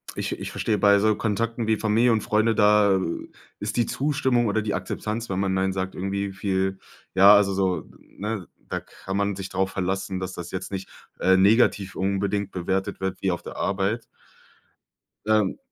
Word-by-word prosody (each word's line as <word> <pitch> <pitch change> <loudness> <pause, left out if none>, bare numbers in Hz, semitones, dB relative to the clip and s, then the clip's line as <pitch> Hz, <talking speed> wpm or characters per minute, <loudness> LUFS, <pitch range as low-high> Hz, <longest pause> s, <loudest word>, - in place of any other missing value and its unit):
Ich - - -3
ich - - -5
verstehe 105 -2 0
bei 100 0 +5
so 110 0 +3
Kontakten 115 +2 -1
wie 110 -1 +2
Familie 115 +3 +3
und 110 -2 +2
Freunde, 110 +1 +2
da 105 -2 +5 0.6
ist 105 +2 -4
die 120 - +3
Zustimmung 130 -4 +1
oder 110 +1 +1
die 105 -1 -2
Akzeptanz, 105 +4 -4
wenn 95 0 -1
man 95 -1 0
nein 95 0 +1
sagt, 95 0 -3
irgendwie 100 +1 -2
viel 95 0 -1 0.3
ja, 100 +2 +8
also 100 -1 +3
so, 95 -2 -1
ne, 105 -2 -6 0.2
da - - -2
kann 95 +1 -7
man 100 0 0
sich 95 0 -6
drauf 95 0 -1
verlassen, 95 0 -2
dass 95 0 -5
das 90 0 -7
jetzt 95 +1 -5
nicht, 95 -1 -5 0.3
äh, 95 0 +4
negativ 100 -1 +3
unbedingt 100 +1 -1
bewertet 95 +2 -2
wird, 95 0 -3
wie 95 - +1
auf 85 - -3
der - - -8
Arbeit. 100 +4 -1 1.2
Ähm. 110 -2 +2
100 Hz, 180 wpm, -25 LUFS, 95-110 Hz, 1.2 s, ja